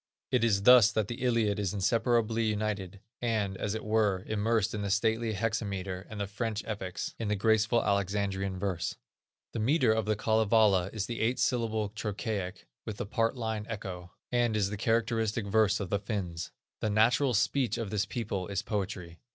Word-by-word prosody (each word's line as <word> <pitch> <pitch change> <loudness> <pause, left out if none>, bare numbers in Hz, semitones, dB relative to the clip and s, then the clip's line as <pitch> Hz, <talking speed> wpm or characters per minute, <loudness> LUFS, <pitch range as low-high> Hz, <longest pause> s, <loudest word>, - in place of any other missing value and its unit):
It 125 -3 +2
is 100 -4 +2
thus 120 -1 +8
that 110 -2 0
the 120 - -5
Iliad 115 -5 +1
is 100 -1 -1
inseparably 115 +2 +1
united, 105 -3 -2 0.2
and, 110 -5 0
as 105 +2 -2
it 110 - -5
were, 105 -4 +1
immersed 110 0 0
in 105 - -3
the 100 - -2
stately 110 +2 +1
hexametre, 100 -3 -3
and 110 - -7
the 100 - -1
French 105 +2 -3
epics, 100 -4 -4
in 115 - -2
the 105 - +1
graceful 110 +2 +2
Alexandrine 100 -1 0
verse. 95 -3 -2 0.6
The - - -4
metre 125 +1 +3
of 110 -2 0
the 110 0 +1
Kalevala 110 -3 +3
is 105 -3 -3
the 115 -2 -5
"eight 120 +3 +1
syllabled 110 -4 0
trochaic, 105 -3 -4 0.2
with 110 -2 -6
the - - -3
part 115 +3 0
line 110 -2 -3
echo," 95 -5 -6 0.2
and 120 -3 +2
is 100 -1 +1
the - - -2
characteristic 115 0 0
verse 105 0 +3
of 95 -4 -5
the 100 - +1
Finns. 95 -6 -4 0.3
The 110 - -1
natural 120 +5 +3
speech 125 +4 +1
of 110 -4 -4
this 105 -2 0
people 100 -4 -3
is 100 -1 -2
poetry. 95 -5 -4
105 Hz, 180 wpm, -30 LUFS, 100-115 Hz, 0.6 s, thus